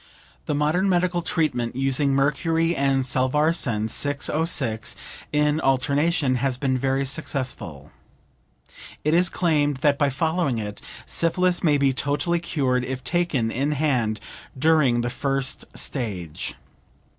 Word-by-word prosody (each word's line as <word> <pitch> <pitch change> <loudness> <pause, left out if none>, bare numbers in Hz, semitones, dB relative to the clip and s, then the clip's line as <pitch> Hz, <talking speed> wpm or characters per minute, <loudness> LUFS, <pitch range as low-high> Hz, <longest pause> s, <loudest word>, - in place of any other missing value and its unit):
The 150 - 0
modern 155 +7 +1
medical 175 -1 +1
treatment 130 -9 -1
using 135 +1 +1
mercury 165 +4 +1
and 135 -1 +1
Salvarsan 130 -3 +1
(606) 145 -2 0 0.4
in 150 +1 +2
alternation, 140 +1 +1
has 130 0 -1
been 130 -1 0
very 135 +1 0
successful. 130 - -4 1.1
It 150 - +1
is 175 +1 +4
claimed 150 -6 +1
that 140 -1 +3
by 145 - +3
following 160 -1 0
it, 105 -2 -5 0.2
syphilis 180 +2 +1
may 150 -4 +4
be 140 -1 +2
totally 145 +6 0
cured 130 -7 0
if 130 0 -5
taken 155 -11 0
in 140 +5 0
hand 125 -7 0 0.4
during 140 -5 +3
the 120 0 -2
first 135 -1 -1
stage. 95 - -4
140 Hz, 120 wpm, -24 LUFS, 130-160 Hz, 1.1 s, is